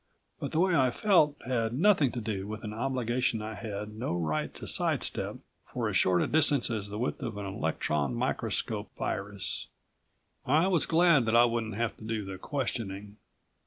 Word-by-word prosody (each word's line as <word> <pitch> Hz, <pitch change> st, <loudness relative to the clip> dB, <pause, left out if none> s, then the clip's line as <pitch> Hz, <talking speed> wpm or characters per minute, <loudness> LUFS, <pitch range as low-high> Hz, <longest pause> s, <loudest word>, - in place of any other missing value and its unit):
But -, -, -4 dB
the 160 Hz, -, 0 dB
way 185 Hz, -1 st, +3 dB
I 130 Hz, -3 st, +4 dB
felt 155 Hz, -, +3 dB
had 115 Hz, -3 st, 0 dB
nothing 155 Hz, -, +4 dB
to 125 Hz, -, -3 dB
do 100 Hz, -3 st, -3 dB
with 110 Hz, 0 st, -6 dB
an 105 Hz, -1 st, -5 dB
obligation 125 Hz, -1 st, 0 dB
I 110 Hz, +1 st, -5 dB
had 105 Hz, -1 st, -6 dB
no 110 Hz, -4 st, -3 dB
right 80 Hz, -3 st, -1 dB
to -, -, -7 dB
sidestep -, -, 0 dB, 0.4 s
for -, -, -1 dB
as -, -, -3 dB
short 90 Hz, -1 st, +4 dB
a -, -, -1 dB
distance 145 Hz, -5 st, +3 dB
as 105 Hz, -3 st, -3 dB
the 105 Hz, -, -5 dB
width 125 Hz, +5 st, -2 dB
of 115 Hz, -5 st, -4 dB
an 100 Hz, -, -4 dB
electron 75 Hz, -7 st, -1 dB
microscoped -, -, -2 dB
virus. 100 Hz, -2 st, -2 dB, 0.8 s
I 155 Hz, +6 st, +3 dB
was 175 Hz, -5 st, +2 dB
glad 165 Hz, -6 st, +5 dB
that 110 Hz, -, +2 dB
I 120 Hz, +1 st, +7 dB
wouldn't 115 Hz, -3 st, -2 dB
have 115 Hz, 0 st, -1 dB
to -, -, -13 dB
do 110 Hz, -2 st, -3 dB
the 95 Hz, -1 st, -7 dB
questioning. 105 Hz, -7 st, -4 dB
115 Hz, 185 wpm, -29 LUFS, 105-135 Hz, 0.8 s, I